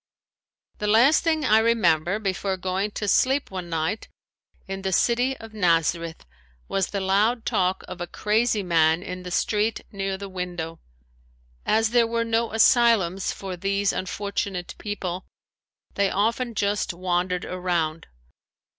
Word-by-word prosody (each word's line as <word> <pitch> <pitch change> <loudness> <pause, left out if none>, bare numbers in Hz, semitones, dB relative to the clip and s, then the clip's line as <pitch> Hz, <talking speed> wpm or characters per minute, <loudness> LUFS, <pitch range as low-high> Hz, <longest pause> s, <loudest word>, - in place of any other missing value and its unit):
The 210 - -1
last 240 +9 +5
thing 315 -2 +1
I 215 +1 +5
remember 185 -6 +2
before 195 -2 -2
going 185 +2 -1
to 210 - -3
sleep 265 +6 +2
one 180 -2 -5
night 165 +6 -2 0.6
in 195 0 -5
the 190 0 -2
city 245 +7 +2
of 225 -1 -11
Nazareth 170 -3 0 0.4
was 195 -1 0
the 200 - -3
loud 210 +5 +1
talk 185 0 0
of 180 - -8
a 175 - -3
crazy 215 +2 +1
man 165 -1 +3
in 180 -1 -6
the 180 - -7
street 210 +4 0
near 195 -1 -3
the 200 +1 -7
window. 175 -3 -5 0.9
As 225 0 +3
there 235 -1 +4
were 230 0 -1
no 230 0 0
asylums 220 -5 +3
for 190 -2 -6
these 195 +2 0
unfortunate 195 -1 -3
people 185 -3 -4 0.7
they 200 -1 +1
often 230 +4 0
just 200 -3 0
wandered 180 0 -1
around. 175 -3 -2
195 Hz, 140 wpm, -24 LUFS, 180-220 Hz, 0.9 s, last